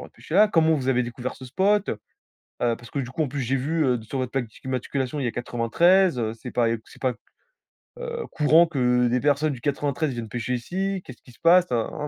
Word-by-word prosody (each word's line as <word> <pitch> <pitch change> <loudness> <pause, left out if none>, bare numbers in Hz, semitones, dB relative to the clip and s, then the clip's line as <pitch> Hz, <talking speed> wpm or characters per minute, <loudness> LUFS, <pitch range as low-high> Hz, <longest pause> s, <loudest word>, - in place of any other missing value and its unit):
droit - - -9
de - - -35
pêcher 155 - -9
là. 210 +3 +6
Comment 160 -4 +3
vous 135 -4 -2
avez 125 -1 +3
découvert 120 +1 -5
ce 130 - -11
spot? 195 +10 +1
Heu, 105 - -4 0.6
parce 120 0 -2
que - - -4
du 125 -2 -5
coup, 145 +5 -1
en 150 - -1
plus, 140 +2 -4
j'ai 130 +1 0
vu, 155 +5 0
heu, 125 -3 +1
sur 110 +5 -5
votre 130 -1 -3
plaque 135 -3 -1
d'immatriculation, 130 +3 -3
il - - -2
y - - +1
a - - -1
93, 130 +9 +2
heu, 110 -2 -1
c'est 120 +2 -9
pas 120 -1 +1 0.2
c'est - - -17
pas, 130 -2 +1 0.9
heu, 475 -1 -4
courant 155 +2 +5
que 125 -6 +2
des 125 +1 +1
personnes 145 +1 +2
du 120 - -9
93 145 +2 -1
viennent 115 -2 -6
pêcher 120 +2 -3
ici. 190 +10 -3
Qu'est-ce 130 - -12
qui - - -17
se 120 - -22
passe? 175 +2 +5
Na, 115 -2 0
na, 150 - -5
130 Hz, 245 wpm, -24 LUFS, 120-160 Hz, 0.9 s, là